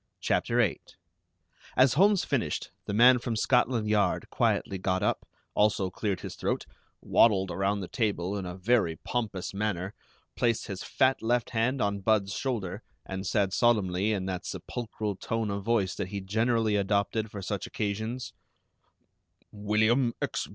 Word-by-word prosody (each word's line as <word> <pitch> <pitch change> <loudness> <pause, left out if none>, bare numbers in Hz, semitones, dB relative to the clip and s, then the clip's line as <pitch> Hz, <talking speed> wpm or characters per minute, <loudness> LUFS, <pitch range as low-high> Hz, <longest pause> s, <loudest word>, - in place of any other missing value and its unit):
CHAPTER - - 0
VIII - - +2 1.0
As 130 0 +6
Holmes 195 +5 +4
finished, 115 - -2
the - - -3
man 125 +3 +7
from 120 -1 -3
Scotland 120 -1 +2
Yard 105 -1 +1
quietly 95 - 0
got 95 0 0
up, - - 0 0.3
also 100 -3 +2
cleared 100 -1 -2
his - - -6
throat, - - -2 0.4
waddled 95 -5 +4
around 100 +1 0
the 90 - -5
table 100 -5 -1
in 100 - -3
a 90 +1 -6
very 95 -4 +2
pompous 105 -3 -3
manner, 100 -2 -2 0.4
placed 115 -2 +1
his 95 -4 -6
fat 130 0 +2
left 120 +1 0
hand 125 +3 +1
on 100 0 0
Budd's 100 -1 +1
shoulder, 105 -6 -3 0.2
and 95 0 -5
said 100 -2 +1
solemnly, 105 -4 +2
in 95 -3 -1
that 95 -2 -3
sepulchral 110 -4 -4
tone 115 -1 -2
of 100 0 -3
voice 105 -4 +1
that 90 - -4
he 100 +1 -4
generally 110 +2 +1
adopted 100 +2 0
for 100 -2 -7
such 100 0 -3
occasions: 110 +4 -3 1.2
"William 110 +4 +2
X. - - -2
105 Hz, 150 wpm, -28 LUFS, 95-115 Hz, 1.2 s, man